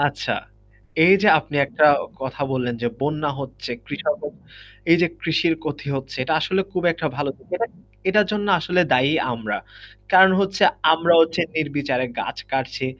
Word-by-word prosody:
আচ্ছা, 145 -4 -1 0.7
এই 190 +3 +7
যে 210 - +5
আপনি 145 0 -6
একটা 150 +2 +1 0.4
কথা 135 +2 -6
বললেন 125 -2 -2
যে 120 - +1
বন্যা 150 +1 -1
হচ্ছে 125 -4 -8 0.2
কৃষক 195 +7 -2 0.7
এই 170 - +8
যে 180 - +5
কৃষির 165 0 +1
ক্ষতি 150 -1 -5
হচ্ছে 135 0 -6
এটা 155 - 0
আসলে 190 +5 0
খুব 180 -2 -2
একটা 160 -1 -4
ভালো 145 -1 -2
দিক। - - -24
এটা 230 - -1 0.4
এটার 210 +1 +4
জন্য 205 -1 -2
আসলে 180 +3 +1
দায়ী 130 +4 +3 0.2
আমরা। 110 -3 -4 0.5
কারণ 190 0 +7
হচ্ছে 195 -1 -1 0.3
আমরা 170 +1 +3
হচ্ছে 165 +1 +2 0.2
নির্বিচারে 140 -4 -1
গাছ - - -5 0.2
কাটছি। 130 0 -2
150 Hz, 160 wpm, -22 LUFS, 135-180 Hz, 0.7 s, এই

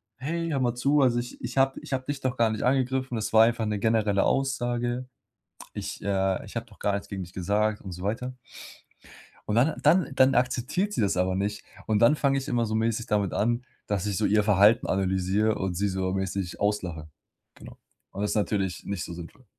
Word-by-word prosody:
hey, 165 +7 -3
hör 145 -4 0
mal 120 -1 +1
zu. 140 +4 +2
Also 120 -3 +3
ich 120 0 -7
ich 120 +2 -5
habe 135 0 +4
d - - -8
ich - - -10
habe 130 -1 -2
dich 145 0 -4
doch 130 -1 -2
gar 115 -1 +3
nicht 110 -1 -3
angegriffen. 130 0 +1
Das 110 - -3
war 110 0 +8
einfach 115 -1 +1
'ne 105 -1 -1
generelle 105 -2 +2
Aussage. 120 -2 -1 0.7
Ich - - -6
äh, 95 -1 0
ich - - -12
habe - - -3
doch - - -20
gar 100 - 0
nichts 100 - -4
gegen 95 -1 -4
dich 90 +1 -12
gesagt,“ 105 +3 0
und 95 - -8
so 90 0 -8
weiter. 120 +6 -3 1.1
Und 105 - +1
dann 135 +7 +3
dann 175 -5 +4
dann 130 0 +5
akzeptiert 130 - 0
sie - - 0
das 100 -3 +1
aber 90 0 +1
nicht. 105 +2 -2 0.2
Und 110 -1 +1
dann 115 +7 +5
fange 140 -2 +1
ich 135 - -4
immer 120 -1 +1
so 110 0 -2
mäßig 115 +1 0
damit 100 -3 0
an, 120 +3 0 0.2
dass 100 -2 -1
ich 100 -3 -1
so 110 - +1
ihr 105 +1 +3
Verhalten 105 +2 +4
analysiere 95 +3 +1
und 95 -2 -2
sie 100 +3 0
so 95 -1 -1
mäßig 95 -1 -3
auslache. 90 -7 -2 0.5
Genau. - - -13 0.3
Und 100 - -4
ist 105 - -1
natürlich 100 -3 -1
nicht 100 -3 -3
so - - -7
sinnvoll. 85 +9 -10
110 Hz, 220 wpm, -27 LUFS, 100-125 Hz, 1.1 s, war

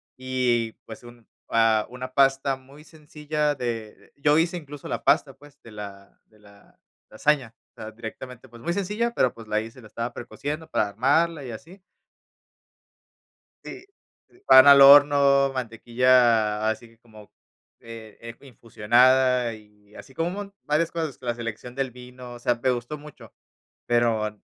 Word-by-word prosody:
Y, 125 -3 -1
pues, 110 +1 -11
un 120 -1 -16 0.2
ah, 115 -1 +2
una 130 +1 -8
pasta 135 0 +2
muy 135 +3 -17
sencilla 150 -1 -3
de 115 -5 -7
yo 145 +1 +2
hice 170 +2 +1
incluso 145 -3 -10
la - - -4
pasta, 135 - +2
pues, 145 +1 -20
de 115 - -15
la 100 -1 -11
de 110 - -27
la 100 -1 -22 0.3
lasaña, 140 -6 0 0.2
o - - -15
sea, 110 - -7
directamente, 120 +3 -10
pues, 120 -1 -16
muy 170 - -3
sencilla, 210 +5 -2
pero, 130 - +1
pues, 115 -1 -13
la 105 - +1
hice. 115 +3 -9
La 110 - -14
estaba 115 +2 -6
precociendo 145 +7 -6
para 105 - 0
armarla 145 +9 0
y 125 - -7
así. 165 - -12 1.9
Sí, 370 - -10 0.4
sí, 360 - -25
pan 130 +1 +8
al 140 0 +9
horno, 140 -1 +6
mantequilla 115 -3 +1
así, 110 +2 -5
que 115 0 -24
como, 110 -3 -17 0.5
eh, 115 -2 -12
es 115 0 -10
infusionada 125 +2 +2
y 105 -1 -18
así, 135 - -13
como 165 +5 -2
un - - -6
mon 200 -1 -8
varias 155 +2 0
cosas, 160 -4 -4
la 120 -2 -3
selección 120 +1 -7
del 135 -1 -3
vino, 125 0 -12
o - - -12
sea, 120 0 0
me 120 +2 -1
gustó 120 +4 -5
mucho. 150 0 -15 0.5
Pero, 110 -3 0
125 Hz, 160 wpm, -24 LUFS, 115-145 Hz, 1.9 s, al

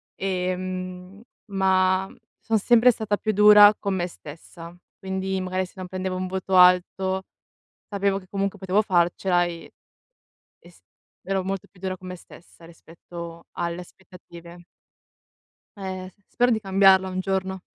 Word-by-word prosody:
Ehm, 185 +1 -4 0.3
ma 190 0 +2 0.3
son 225 -1 0
sempre 240 +3 +5
stata 210 -2 -2
più 215 -1 -2
dura 210 0 +8
con 200 -2 -2
me 175 -1 -1
stessa, 165 +2 -12 0.2
quindi 190 0 -3
magari 185 0 -2
se 180 - -18
non 185 -1 -6
prendevo 185 0 -4
un 185 0 -3
voto 190 0 -3
alto, 185 +1 +4 0.7
sapevo 200 -1 0
che 185 - -15
comunque 200 0 -3
potevo 190 +3 +1
farcela 175 -1 +1
e 170 -1 -8 0.9
e - - -18
s - - -23 0.4
ero 195 -1 -2
molto 195 0 -4
più 185 - -23
dura 185 -1 -3
con 185 - -12
me 180 - -6
stessa, 170 -1 -17
rispetto 170 0 -11
alle 170 0 -4
aspettative. 175 -1 -15 1.1
Eh, 185 -1 -6
s 200 - -39
spero 245 +1 +2
di 220 -2 +1
cambiarla 190 -1 +4
un 185 0 -3
giorno. 190 0 -2
185 Hz, 145 wpm, -24 LUFS, 180-195 Hz, 1.1 s, dura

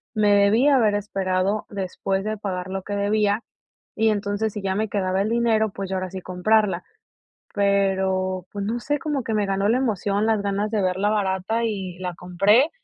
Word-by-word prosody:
Me 210 -1 +4
debí 205 +6 +4
haber 235 -7 +4
esperado 195 0 -1
después 195 0 -2
de 215 0 -2
pagar 185 -3 -4
lo 190 0 -4
que 205 - -4
debía, 205 +2 +1 0.5
y 220 0 +3
entonces, 205 0 -1
si 210 - -5
ya 190 -1 -1
me 215 +1 -1
quedaba 190 -1 0
el 210 - -1
dinero, 225 -2 +2
pues, 195 -1 -6
yo 190 - -2
ahora 185 0 -3
sí 190 - -5
comprarla". 200 +3 +1 0.7
Pero, 190 -2 +1
pues, 200 -1 -4
no 230 +3 -2
sé, 290 +2 -1
como 290 -3 -2
que 225 - -3
me 210 -1 +1
ganó 195 +1 +1
la 235 - +3
emoción, 210 -4 0
las 220 -2 +2
ganas 200 +1 -1
de 215 -3 +1
verla 185 +2 +1
barata 205 +2 0
y 190 -5 -4
la 180 -1 -4
compré. 195 - +3
200 Hz, 190 wpm, -23 LUFS, 190-215 Hz, 0.7 s, Me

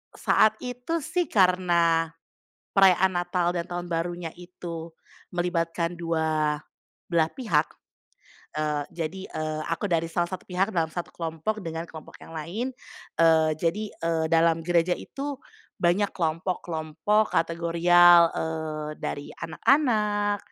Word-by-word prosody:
saat 215 0 +4
itu 250 +7 -3
sih 355 +4 0
karena 175 -4 +3 0.7
perayaan 190 -1 +5
Natal 175 0 0
dan 170 0 -3
Tahun 175 0 -4
Barunya 170 0 -2
itu 175 -2 -8 0.5
melibatkan 170 -1 -1
2 160 -2 0 0.5
belah 165 -2 +2
pihak, 165 - 0 0.9
eee, 150 -1 0
jadi, 170 +2 -4
eee, 155 0 -3
aku 165 +5 -1
dari 165 -3 0
salah 175 +1 0
satu 185 +1 -6
pihak 190 +3 -1
dalam 160 -2 +1
1 175 +2 -6
kelompok 170 +6 -3
dengan 165 0 -5
kelompok 160 -2 -12
yang 165 - -12
lain, 210 +12 -4 0.4
eee, 160 -1 +4
jadi, 170 +7 -1
eee, 165 -1 -1
dalam 165 0 +3
gereja 175 0 +2
itu 280 -1 -6 0.4
banyak 185 +4 +2
kelompok-kelompok 165 +3 -1
kategorial, 170 +1 +5
eee, 160 -1 -3
dari 145 - -4
anak-anak, 205 - +2
170 Hz, 120 wpm, -26 LUFS, 165-185 Hz, 0.9 s, perayaan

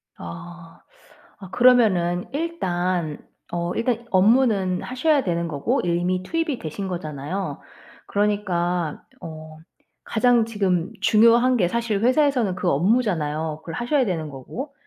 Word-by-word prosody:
아. 165 - -10 0.6
아 190 -3 -10
그러면은 195 -8 +3
일단 180 - -2 0.3
어 175 0 -2
일단 235 0 -1
업무는 200 -2 +3
하셔야 275 +3 +1
되는 170 -2 -1
거고 165 - -1
이미 175 +1 0
투입이 325 - -2
되신 190 +5 -5
거잖아요. 155 -1 -4 0.5
그러니까 180 -6 -1 0.2
어 155 -1 -9 0.5
가장 240 0 +3
지금 190 -6 -1
중요한 235 +3 +5
게 180 -6 +2
사실 225 0 -1
회사에서는 255 -5 +2
그 180 -1 -1
업무잖아요. 160 - 0
그걸 165 -1 -7
하셔야 255 - +1
되는 165 -6 -3
거고. 215 - -8
185 Hz, 270 characters per minute, -23 LUFS, 170-235 Hz, 0.6 s, 중요한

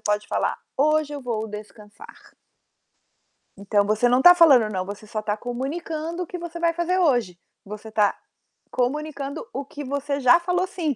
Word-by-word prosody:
pode 210 0 -1
falar: - - -1 0.2
"Hoje 305 +1 +2
eu 285 - -5
vou 225 -3 -3
descansar". 210 0 -11 1.4
Então, 200 +1 +1
você 215 +4 +2
não 250 +2 +3
tá 355 - +10
falando 265 -11 +6
"não", 185 -1 -3
você 205 +2 -8
só 215 0 -4
tá 210 0 -2
comunicando 310 +8 -4
o - - -10
que 360 - -6
você 340 0 -7
vai 335 -1 +2
fazer 345 +2 0
hoje. 240 - +1 0.3
Você 210 +2 -9
tá 210 -2 +2 0.5
comunicando 280 - -3
o 280 - -3
que 290 +1 -8
você 280 +1 -3
já 265 +5 +6
falou 360 +1 0
"sim", 320 -7 -2
270 Hz, 170 wpm, -23 LUFS, 215-320 Hz, 1.4 s, tá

